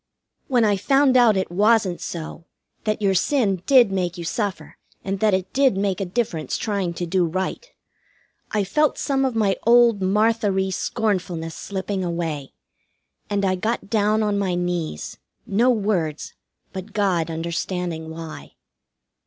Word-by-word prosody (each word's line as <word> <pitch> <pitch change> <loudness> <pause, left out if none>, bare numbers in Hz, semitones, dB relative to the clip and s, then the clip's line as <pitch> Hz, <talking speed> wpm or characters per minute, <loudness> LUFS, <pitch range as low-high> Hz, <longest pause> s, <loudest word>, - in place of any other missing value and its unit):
When 245 -4 +3
I 205 -2 +2
found 270 +5 +3
out 235 -5 +5
it 190 -2 -2
wasn't 205 -1 +2
so 165 0 -6 0.4
that 215 0 -1
your 195 -1 +3
sin 195 - +1
did 250 -7 +6
make 180 -2 -1
you 170 - -5
suffer, 205 +3 -3 0.3
and 195 0 -2
that 210 -2 +3
it 185 0 -4
did 270 -7 +3
make 195 -1 -1
a - - 0
difference 175 - -2
trying 195 -5 -2
to 175 - -3
do 180 +1 +1
right 185 - -3 0.8
I 210 -2 0
felt 300 +10 +1
some 270 -1 0
of 255 -3 -1
my 205 -3 +2
old 235 -3 +5
Martha 210 +2 +2
ry 190 0 0
scornfulness 180 -6 -2
slipping 190 +1 -4
away. 165 -5 -3 0.8
And 200 -1 0
I 185 - +2
got 215 +2 -3
down 215 0 +2
on 205 -1 0
my 190 -3 0
knees, 175 - -3 0.3
no 230 +6 +2
words, 195 -10 -1 0.4
but 190 +2 -7
God 185 -6 +1
understanding 170 0 -3
why. 160 - -9
195 Hz, 155 wpm, -22 LUFS, 175-220 Hz, 0.8 s, did